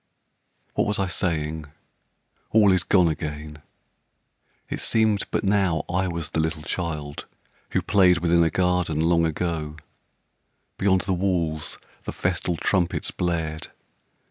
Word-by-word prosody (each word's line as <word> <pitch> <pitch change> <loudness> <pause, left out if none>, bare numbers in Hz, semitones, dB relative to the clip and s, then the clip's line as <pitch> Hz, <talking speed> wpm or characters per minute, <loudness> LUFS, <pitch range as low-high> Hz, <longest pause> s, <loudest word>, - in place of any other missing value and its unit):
What 105 - +1
was 105 - 0
I 100 - +1
saying? 80 -3 -1 0.8
All 105 -3 +5
is 95 -2 +2
gone 90 -2 +4
again. 75 -1 -4 1.1
It - - -4
seemed 110 -3 +2
but - - -1
now 95 -5 +2
I 95 +1 0
was 85 -2 -4
the 80 - -1
little 80 -1 -1
child 75 -4 -4 0.5
Who - - +1
played 95 -4 +5
within 85 0 +3
a 80 - +3
garden 90 -4 +1
long 85 0 +3
ago. 80 -2 -3 1.0
Beyond 95 -1 +3
the 95 0 -1
walls 85 -4 -1 0.2
the - - -5
festal 90 -1 -1
trumpets 90 -1 0
blared. 80 -3 -2
85 Hz, 130 wpm, -24 LUFS, 80-95 Hz, 1.1 s, All